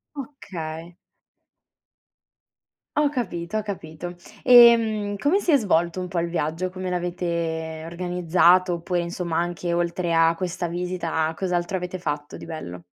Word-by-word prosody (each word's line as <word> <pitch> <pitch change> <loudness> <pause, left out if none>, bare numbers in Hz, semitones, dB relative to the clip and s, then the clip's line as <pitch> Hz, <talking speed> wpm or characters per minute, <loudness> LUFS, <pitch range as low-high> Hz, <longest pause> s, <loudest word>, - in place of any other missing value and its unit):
Okay. 175 - -7 2.0
Ho 295 -1 +3
capito, 195 - -3
ho - - 0
capito. 175 -4 -6 0.3
Ehm, 225 -4 +6
come 320 - +2
si 355 - 0
è 285 - +7
svolto 175 -6 +1
un 180 - -3
po' 180 - -5
il 170 0 0
viaggio? 165 +2 -2
Come 185 0 -4
l'avete 170 -3 -2
organizzato? 180 +1 +3
Oppure, 175 +1 -1
insomma, 170 -1 -3
anche 175 0 -2
oltre 170 0 0
a 165 0 +5
questa 175 0 -3
visita, 170 -2 -2
cos'altro 180 0 -1
avete 180 0 -5
fatto 145 -3 -4
di - - -10
bello? 90 - -7
175 Hz, 135 wpm, -24 LUFS, 165-185 Hz, 2.0 s, è